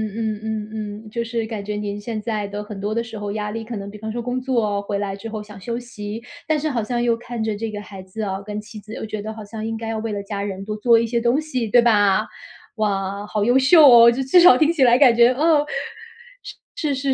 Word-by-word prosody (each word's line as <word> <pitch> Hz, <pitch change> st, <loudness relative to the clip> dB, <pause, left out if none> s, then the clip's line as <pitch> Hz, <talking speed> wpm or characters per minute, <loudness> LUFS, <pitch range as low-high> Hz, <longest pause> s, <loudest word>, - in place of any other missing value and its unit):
嗯 220 Hz, -2 st, -2 dB
嗯 215 Hz, -1 st, -5 dB
嗯。 -, -, -11 dB
就 235 Hz, +2 st, -3 dB
是 230 Hz, -1 st, -3 dB
感 220 Hz, -3 st, -5 dB
觉 210 Hz, +1 st, -4 dB
您 205 Hz, 0 st, -4 dB
现 220 Hz, +1 st, -4 dB
在 215 Hz, -2 st, -3 dB
的 205 Hz, +1 st, -5 dB
很 205 Hz, -2 st, -8 dB
多 205 Hz, +2 st, -2 dB
的 230 Hz, -, 0 dB
时 225 Hz, -1 st, -9 dB
候 205 Hz, -1 st, -4 dB
压 210 Hz, -1 st, -3 dB
力， 225 Hz, 0 st, -5 dB
可 230 Hz, +1 st, -7 dB
能 200 Hz, -1 st, -6 dB
比 210 Hz, -, -10 dB
方 220 Hz, +1 st, -5 dB
说 240 Hz, +1 st, -4 dB
工 250 Hz, +2 st, -2 dB
作 220 Hz, -6 st, 0 dB
回 200 Hz, 0 st, -3 dB
来 195 Hz, -1 st, -3 dB
之 225 Hz, +3 st, -8 dB
后 215 Hz, -1 st, -5 dB
想 210 Hz, -2 st, -12 dB
休 235 Hz, +4 st, -4 dB
息， 215 Hz, -2 st, -7 dB, 0.3 s
但 310 Hz, -1 st, +1 dB
是 310 Hz, +1 st, -1 dB
好 235 Hz, -5 st, -1 dB
像 240 Hz, +2 st, -2 dB
又 235 Hz, -1 st, +2 dB
看 235 Hz, -1 st, -5 dB
着 220 Hz, -1 st, -1 dB
这 225 Hz, +1 st, -4 dB
个 205 Hz, 0 st, -6 dB
孩 195 Hz, -2 st, -10 dB
子 190 Hz, +4 st, -8 dB
啊， 195 Hz, -1 st, -3 dB
跟 210 Hz, +1 st, -6 dB
妻 215 Hz, 0 st, -10 dB
子 215 Hz, +1 st, -11 dB
又 -, -, -5 dB
觉 215 Hz, -1 st, -5 dB
得 220 Hz, +1 st, -6 dB
好 215 Hz, -1 st, -9 dB
像 215 Hz, +1 st, -6 dB
应 225 Hz, 0 st, -3 dB
该 225 Hz, 0 st, -6 dB
要 225 Hz, -, -2 dB
为 225 Hz, -1 st, -4 dB
了 200 Hz, -1 st, -3 dB
家 200 Hz, 0 st, -5 dB
人 195 Hz, -1 st, -4 dB
多 210 Hz, -, -4 dB
做 230 Hz, +1 st, +4 dB
一 230 Hz, -, 0 dB
些 235 Hz, 0 st, 0 dB
东 240 Hz, +4 st, +2 dB
西， 260 Hz, -7 st, -3 dB
对 240 Hz, +3 st, +5 dB
吧？ 205 Hz, -4 st, +3 dB, 0.5 s
哇！ 200 Hz, -2 st, -2 dB
好 210 Hz, -1 st, -1 dB
优 245 Hz, +4 st, +4 dB
秀 305 Hz, +3 st, +7 dB
哦， 235 Hz, -1 st, +9 dB
这 265 Hz, +3 st, -2 dB
至 270 Hz, +8 st, +5 dB
少 345 Hz, -8 st, +8 dB
听 315 Hz, +1 st, +3 dB
起 300 Hz, -6 st, +2 dB
来 245 Hz, 0 st, +6 dB
感 250 Hz, -4 st, +6 dB
觉 240 Hz, +2 st, +5 dB
嗯。 300 Hz, +1 st, +3 dB, 1.1 s
是 300 Hz, -, -1 dB
是 270 Hz, 0 st, 0 dB
220 Hz, 290 characters per minute, -21 LUFS, 205-240 Hz, 1.1 s, 哦